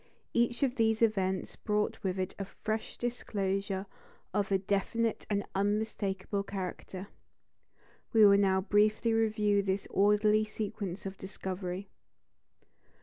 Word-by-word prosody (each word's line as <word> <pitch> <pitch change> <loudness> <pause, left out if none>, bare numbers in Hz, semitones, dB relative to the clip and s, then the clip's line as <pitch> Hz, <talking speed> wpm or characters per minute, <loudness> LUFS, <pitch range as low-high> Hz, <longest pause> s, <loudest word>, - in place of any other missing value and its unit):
Each 240 +3 +2
of 265 -1 +1
these 225 0 +3
events 190 -4 +1
brought 210 -1 -1
with 190 -2 -1
it 185 0 -2
a 195 - -2
fresh 215 +3 -4
disclosure 195 -5 -2 0.5
of 205 -1 0
a 195 - +5
definite 205 +4 -1
and 205 -1 0
unmistakable 200 -1 -1
character. 190 0 -6 1.0
We 220 -2 +7
will 200 0 +7
now 190 -1 +3
briefly 215 +3 +3
review 215 -2 +2
this 195 0 -1
orderly 210 +2 +4
sequence 205 -3 -5
of 195 0 -6
discovery. 190 0 -5
200 Hz, 120 wpm, -31 LUFS, 195-215 Hz, 1.0 s, We